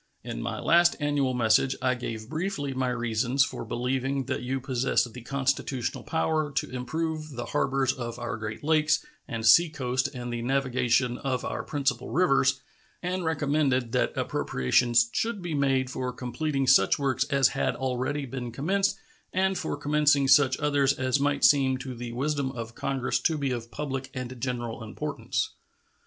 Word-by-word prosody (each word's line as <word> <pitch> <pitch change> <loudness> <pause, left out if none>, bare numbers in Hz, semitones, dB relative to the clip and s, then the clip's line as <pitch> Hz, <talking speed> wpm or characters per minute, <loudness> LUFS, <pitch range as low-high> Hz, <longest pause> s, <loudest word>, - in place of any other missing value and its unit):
In - - -5
my - - -3
last 170 +1 +4
annual 145 -3 0
message 120 +3 +3
I 130 -1 +2
gave 115 -3 -5
briefly 155 -2 -3
my 130 -1 0
reasons 125 +2 +1
for - - -6
believing 130 +2 -1
that - - -2
you 130 +2 -2
possessed 125 -2 0
the 125 - -8
constitutional 135 0 -2
power 160 -1 0
to 135 - -2
improve 155 +5 -3
the 120 - -4
harbors 135 -1 +1
of 120 -2 -6
our 120 -2 -4
Great 110 +2 -6
Lakes 155 - +2 0.2
and 115 -1 -4
seacoast 130 -1 +4
and 120 -1 -5
the 120 - -3
navigation 125 -1 +1
of 130 -2 -2
our - - -3
principal 135 -4 -2
rivers, 135 -6 +3 0.4
and 180 +1 -2
recommended 145 -6 +1
that - - 0
appropriations 115 - +2
should 230 -2 -1
be 175 -3 -4
made 135 -2 +2
for 130 -1 -3
completing 135 +3 -2
such 95 -6 +5
works 135 -3 0
as 135 -2 +3
had - - -1
already 130 +2 -2
been 125 -2 -5
commenced 195 - 0 0.3
and 190 +1 +1
for - - -3
commencing 145 -1 +3
such 135 -1 +5
others 145 -2 +2
as 130 0 0
might 145 0 0
seem 130 0 +5
to 130 0 -6
the 120 0 -6
wisdom 140 +1 -1
of 115 -1 -6
Congress 135 -1 -1
to 160 -2 +1
be 140 -2 -1
of 120 -2 -4
public 135 0 -4
and 125 -1 -6
general 120 -2 -3
importance. 110 -3 -3
130 Hz, 165 wpm, -27 LUFS, 125-145 Hz, 0.4 s, such